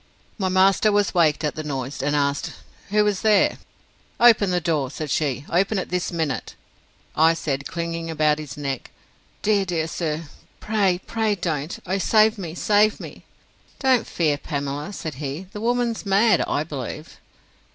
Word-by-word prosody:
My 190 Hz, -2 st, 0 dB
master 190 Hz, +3 st, +4 dB
was 205 Hz, 0 st, +2 dB
waked 160 Hz, -4 st, +3 dB
at 150 Hz, -, 0 dB
the 155 Hz, -, -5 dB
noise, 135 Hz, -2 st, -4 dB
and 145 Hz, +2 st, 0 dB
asked, 140 Hz, -1 st, 0 dB, 0.4 s
Who 210 Hz, +1 st, +3 dB
was 205 Hz, -2 st, 0 dB
there? 215 Hz, -3 st, +3 dB, 0.6 s
Open 225 Hz, -4 st, +6 dB
the 180 Hz, -1 st, +1 dB
door, 155 Hz, -6 st, 0 dB
said 150 Hz, +1 st, -5 dB
she; 145 Hz, -2 st, -1 dB
open 195 Hz, +5 st, +1 dB
it 185 Hz, -, -3 dB
this 180 Hz, 0 st, -1 dB
minute! 160 Hz, -6 st, -3 dB, 0.6 s
I 160 Hz, +1 st, +5 dB
said, 140 Hz, -4 st, -3 dB
clinging 170 Hz, -1 st, -4 dB
about 155 Hz, -1 st, +2 dB
his 145 Hz, -2 st, -8 dB
neck, 135 Hz, -3 st, -4 dB, 0.5 s
Dear, 205 Hz, -2 st, +3 dB
dear 170 Hz, -4 st, -1 dB
sir, 165 Hz, -1 st, -3 dB, 0.4 s
pray, 200 Hz, -4 st, +1 dB
pray 220 Hz, -2 st, 0 dB
don't!—O 175 Hz, +2 st, -3 dB
save 215 Hz, +2 st, +4 dB
me, 170 Hz, -3 st, -6 dB
save 210 Hz, +3 st, +3 dB
me! -, -, -10 dB, 0.5 s
Don't 260 Hz, -4 st, +2 dB
fear, 150 Hz, -4 st, 0 dB
Pamela, 145 Hz, +5 st, -4 dB
said 160 Hz, -5 st, -5 dB
he. 145 Hz, +6 st, -4 dB
The 210 Hz, -, -6 dB
woman's 240 Hz, 0 st, 0 dB
mad, 200 Hz, 0 st, +3 dB
I 145 Hz, -, 0 dB
believe. 150 Hz, 0 st, -7 dB
170 Hz, 160 wpm, -23 LUFS, 150-205 Hz, 0.6 s, Open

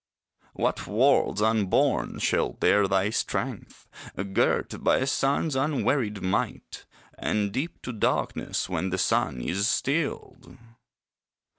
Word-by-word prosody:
What -, -, -1 dB
worlds 105 Hz, -, +2 dB
unborn 110 Hz, -3 st, +1 dB
shall -, -, 0 dB
dare 100 Hz, -1 st, +3 dB
thy 95 Hz, +1 st, +1 dB
strength, -, -, -4 dB, 0.5 s
Girt -, -, 0 dB
by -, -, +4 dB
a 130 Hz, -, 0 dB
sun's 140 Hz, +2 st, 0 dB
unwearied 135 Hz, -6 st, 0 dB
might, 95 Hz, -, -3 dB, 0.3 s
And 105 Hz, -2 st, 0 dB
dip 145 Hz, -, -4 dB
to 125 Hz, -, -5 dB
darkness 110 Hz, -, -1 dB
when 90 Hz, +1 st, -2 dB
the 95 Hz, -, -2 dB
sun 65 Hz, -7 st, 0 dB
is 100 Hz, -, 0 dB
stilled! 145 Hz, +5 st, -2 dB
105 Hz, 115 wpm, -26 LUFS, 95-135 Hz, 0.5 s, by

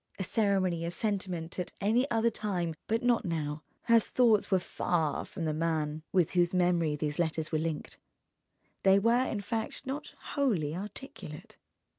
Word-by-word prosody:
A 190 Hz, -, -2 dB
ceremony 190 Hz, -4 st, +1 dB
of 170 Hz, +1 st, -3 dB
sentiment 185 Hz, -5 st, -2 dB
at 180 Hz, -, -3 dB
any 235 Hz, +7 st, +2 dB
other 230 Hz, 0 st, +2 dB
time, 185 Hz, -6 st, -2 dB
but 225 Hz, +2 st, 0 dB
not 245 Hz, -1 st, +3 dB
now: 155 Hz, -4 st, -2 dB, 0.2 s
her 230 Hz, -1 st, +6 dB
thoughts 225 Hz, -2 st, +3 dB
were 190 Hz, -, +4 dB
far 165 Hz, -4 st, -1 dB
from 170 Hz, -4 st, -5 dB
the 155 Hz, -, 0 dB
man 155 Hz, -1 st, -1 dB
with 180 Hz, -4 st, +3 dB
whose 175 Hz, 0 st, +2 dB
memory 175 Hz, -4 st, +2 dB
these 150 Hz, +1 st, -2 dB
letters 160 Hz, -2 st, 0 dB
were 155 Hz, -, +1 dB
linked, 160 Hz, -1 st, -4 dB, 0.8 s
they 195 Hz, 0 st, +6 dB
were 235 Hz, +5 st, +3 dB
in 210 Hz, -, -2 dB
fact 225 Hz, +5 st, -3 dB
not 270 Hz, +3 st, -5 dB, 0.2 s
wholly 190 Hz, -, +1 dB
articulate. 190 Hz, -, -8 dB
180 Hz, 160 wpm, -30 LUFS, 160-220 Hz, 0.8 s, her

